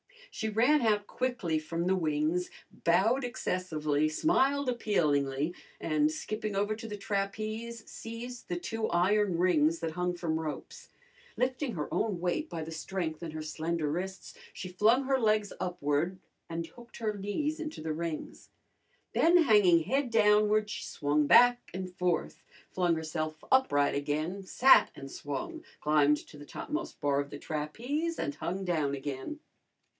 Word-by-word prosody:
She 220 Hz, -, -2 dB
ran 245 Hz, +8 st, +4 dB
out 210 Hz, -3 st, +2 dB
quickly 205 Hz, -13 st, -1 dB
from 165 Hz, +2 st, -3 dB
the 190 Hz, +1 st, +3 dB
wings, 160 Hz, +1 st, 0 dB, 0.4 s
bowed 220 Hz, +10 st, +3 dB
excessively, 155 Hz, -10 st, -1 dB
smiled 280 Hz, -, +2 dB
appealingly, 150 Hz, -, +1 dB, 0.3 s
and, 155 Hz, -1 st, +2 dB
skipping 215 Hz, +6 st, -4 dB
over 205 Hz, +2 st, +1 dB
to 225 Hz, +1 st, -7 dB
the 210 Hz, -1 st, -5 dB
trapeze, 215 Hz, +3 st, -3 dB
seized 235 Hz, +2 st, -8 dB
the 175 Hz, -, -2 dB
two 225 Hz, +4 st, -2 dB
iron 185 Hz, +1 st, +2 dB
rings 165 Hz, -2 st, +3 dB
that 165 Hz, -1 st, -2 dB
hung 180 Hz, +2 st, -1 dB
from 160 Hz, -2 st, -1 dB
ropes. 155 Hz, -2 st, -6 dB, 0.5 s
Lifting 255 Hz, 0 st, 0 dB
her 150 Hz, -5 st, -4 dB
own 205 Hz, -6 st, 0 dB
weight 180 Hz, -, -1 dB
by 165 Hz, -1 st, -4 dB
the 160 Hz, -, -7 dB
strength 160 Hz, -1 st, -4 dB
in 165 Hz, -2 st, -5 dB
her 155 Hz, 0 st, -5 dB
slender 160 Hz, 0 st, -2 dB
wrists, 190 Hz, +4 st, -5 dB, 0.2 s
she 185 Hz, -, -6 dB
flung 220 Hz, +8 st, +3 dB
her 270 Hz, 0 st, +1 dB
legs 215 Hz, -3 st, +2 dB
upward 170 Hz, 0 st, -1 dB, 0.3 s
and 165 Hz, 0 st, -3 dB
hooked 240 Hz, +7 st, -14 dB
her 215 Hz, -2 st, -2 dB
knees 285 Hz, +11 st, -2 dB
into 310 Hz, -, -5 dB
the 155 Hz, 0 st, -2 dB
rings. 165 Hz, 0 st, -5 dB, 0.6 s
Then 340 Hz, +1 st, +5 dB
hanging 205 Hz, -, +5 dB
head 270 Hz, -, 0 dB
downward 210 Hz, -1 st, +4 dB
she -, -, -5 dB
swung 145 Hz, 0 st, 0 dB
back 245 Hz, +5 st, +6 dB
and 185 Hz, 0 st, -5 dB
forth; 180 Hz, -2 st, -1 dB, 0.3 s
flung 175 Hz, -2 st, +2 dB
herself 155 Hz, -1 st, -4 dB
upright 145 Hz, -, +4 dB
again, 155 Hz, +7 st, -2 dB
sat 255 Hz, +7 st, +6 dB
and 135 Hz, 0 st, -9 dB
swung; 320 Hz, -, -5 dB, 0.2 s
climbed 150 Hz, -1 st, +4 dB
to 150 Hz, -, -13 dB
the 145 Hz, -, -10 dB
topmost 310 Hz, -, -5 dB
bar 140 Hz, -1 st, +2 dB
of 140 Hz, 0 st, -3 dB
the 145 Hz, -, -7 dB
trapeze 240 Hz, -, -3 dB
and 145 Hz, -, -2 dB
hung 190 Hz, +3 st, -3 dB
down 155 Hz, -6 st, 0 dB
again. 140 Hz, -, -5 dB
180 Hz, 155 wpm, -30 LUFS, 155-225 Hz, 0.6 s, back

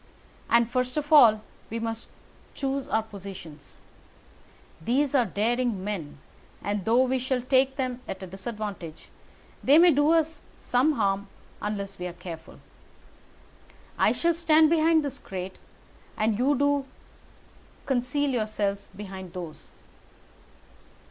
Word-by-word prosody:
And, 235 Hz, 0 st, +4 dB
first 255 Hz, +3 st, -1 dB
of 295 Hz, +1 st, -1 dB
all, 225 Hz, -7 st, +7 dB, 0.3 s
we 230 Hz, -, -3 dB
must 225 Hz, 0 st, -4 dB, 0.5 s
choose 275 Hz, 0 st, -2 dB
our 220 Hz, -, +1 dB
positions. 195 Hz, -8 st, -10 dB, 1.0 s
These 270 Hz, -, +1 dB
are 255 Hz, -4 st, +4 dB
daring 230 Hz, -1 st, 0 dB
men, 190 Hz, -9 st, -4 dB, 0.5 s
and 205 Hz, -2 st, -2 dB
though 235 Hz, +3 st, +4 dB
we 260 Hz, 0 st, 0 dB
shall 255 Hz, -1 st, -1 dB
take 265 Hz, +1 st, +3 dB
them 255 Hz, -2 st, -3 dB
at 190 Hz, 0 st, -6 dB
a -, -, -4 dB
disadvantage, 195 Hz, -3 st, -7 dB, 0.5 s
they 285 Hz, +3 st, +6 dB
may 345 Hz, +1 st, +7 dB
do 290 Hz, +1 st, +3 dB
us 320 Hz, -1 st, +2 dB, 0.2 s
some 260 Hz, +5 st, +2 dB
harm 200 Hz, -4 st, 0 dB, 0.3 s
unless 200 Hz, -2 st, -4 dB
we 180 Hz, -, -3 dB
are 175 Hz, -, -7 dB
careful. 170 Hz, -2 st, -9 dB, 1.4 s
I -, -, +5 dB
shall 340 Hz, 0 st, +2 dB
stand 320 Hz, -1 st, +4 dB
behind 320 Hz, -1 st, +4 dB
this 280 Hz, -, -5 dB
crate, 185 Hz, 0 st, -7 dB, 0.6 s
and 215 Hz, 0 st, +1 dB
do 260 Hz, +6 st, +2 dB
you 285 Hz, 0 st, +2 dB, 1.0 s
conceal 270 Hz, +2 st, 0 dB
yourselves 215 Hz, -4 st, -2 dB
behind 190 Hz, -3 st, -8 dB
those. 175 Hz, -4 st, -8 dB
235 Hz, 130 wpm, -27 LUFS, 200-275 Hz, 1.4 s, all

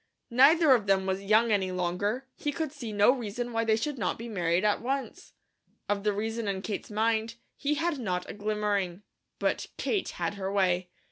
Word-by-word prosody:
Neither 280 Hz, +4 st, +6 dB
of 220 Hz, -5 st, +1 dB
them 190 Hz, -1 st, +3 dB
was 190 Hz, 0 st, -1 dB
young 215 Hz, +3 st, +3 dB
any 190 Hz, -3 st, +1 dB
longer; 185 Hz, +8 st, -1 dB
he 295 Hz, -, -2 dB
could 310 Hz, 0 st, -3 dB
see 250 Hz, -7 st, -7 dB
no 205 Hz, +3 st, +5 dB
reason 240 Hz, -1 st, -4 dB
why 225 Hz, 0 st, +1 dB
they 220 Hz, -1 st, +3 dB
should 275 Hz, +4 st, -3 dB
not -, -, -1 dB
be 230 Hz, -, -7 dB
married 175 Hz, -3 st, 0 dB
at 210 Hz, -, +2 dB
once. 270 Hz, +3 st, -4 dB, 0.5 s
Of 200 Hz, -1 st, -1 dB
the 210 Hz, -, +2 dB
reason 220 Hz, +2 st, -3 dB
in 195 Hz, -1 st, -2 dB
Kate's 210 Hz, -, -4 dB
mind, 220 Hz, +1 st, 0 dB, 0.2 s
he 295 Hz, +1 st, 0 dB
had 325 Hz, -2 st, -1 dB
not 180 Hz, -6 st, -2 dB
a -, -, -6 dB
glimmering. 205 Hz, -3 st, -1 dB, 0.3 s
But -, -, -1 dB
Kate 405 Hz, -4 st, -1 dB
had 170 Hz, +2 st, -3 dB
her 195 Hz, -1 st, -4 dB
way. 185 Hz, -2 st, +1 dB
215 Hz, 195 wpm, -29 LUFS, 195-245 Hz, 0.5 s, Neither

